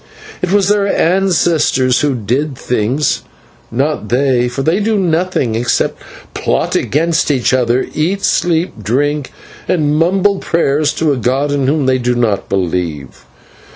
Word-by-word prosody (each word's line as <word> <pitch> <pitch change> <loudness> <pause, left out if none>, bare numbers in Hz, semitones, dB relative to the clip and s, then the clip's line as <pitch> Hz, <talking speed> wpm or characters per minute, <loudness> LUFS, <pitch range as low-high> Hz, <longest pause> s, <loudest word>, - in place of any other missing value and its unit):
It 180 - -1
was 200 -1 +3
their 205 -1 +2
ancestors 165 -9 +2
who 145 -3 +1
did 130 +6 -2
the - - -18
things, 125 +5 0 0.5
not 135 -2 -2
they, 125 -1 +2
for 135 +3 -4
they 165 +6 +1
do 215 +1 0
nothing 175 - 0
except 120 +2 -1 0.3
plot - - -1
against 165 +3 +1
each 130 -3 +1
other, 125 0 +1
eat, 180 +6 -1
sleep, 165 - 0
drink, 140 +6 -1 0.4
and 150 -4 +1
mumble 190 +5 +2
prayers 150 -3 +1
to 155 -3 +1
a - - -2
god 130 +5 0
in 140 -2 0
whom 145 0 +1
they 130 0 +2
do 125 0 0
not 115 -5 -1
believe. 85 -9 -3
145 Hz, 150 wpm, -15 LUFS, 125-165 Hz, 0.5 s, was